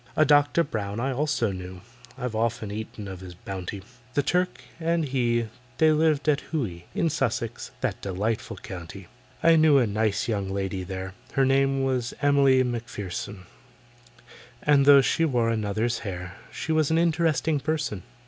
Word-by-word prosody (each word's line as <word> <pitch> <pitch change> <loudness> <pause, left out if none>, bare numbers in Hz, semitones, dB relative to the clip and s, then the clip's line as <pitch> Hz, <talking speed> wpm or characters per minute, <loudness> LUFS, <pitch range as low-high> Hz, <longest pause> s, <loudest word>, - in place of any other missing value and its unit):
A 155 - +5
DOCTOR 145 +3 +4
BROWN 105 -5 -4
I 135 +3 0
also 140 -5 0
knew— 90 -1 -8 0.4
I've 125 -3 -3
often 115 -1 -1
eaten 105 -1 -6
of 95 -2 -7
his 90 -1 -10
bounty; 95 +1 -6 0.3
The 145 - +2
Turk 180 +5 0 0.2
and 165 -1 +1
he 120 -4 +1 0.3
they 160 0 +5
lived 155 -1 +2
at 145 -2 +3
Hooe, 110 - -2
In 170 - +2
Sussex, 120 -6 -2
that - - -2
delightful 100 +4 -2
county! 90 +1 -9 0.3
I 165 0 +6
knew 155 -2 +6
a 130 - +4
nice 105 -1 0
young 100 -4 -1
lady 95 -1 -2
there, 95 0 -6 0.2
Her 135 - +3
name 135 0 +2
was 130 -3 -1
EMILY 140 -2 +4
MACPHERSON, 105 -5 -5 1.2
And 145 -2 +4
though 140 -1 +9
she 165 - +1
wore 120 -7 +2
another's 110 +2 -1
hair, 90 -3 -6 0.2
She 160 - -4
was 155 -2 +2
an 160 - +2
interesting 160 -2 +2
person. 150 - -2
120 Hz, 160 wpm, -26 LUFS, 100-145 Hz, 1.2 s, though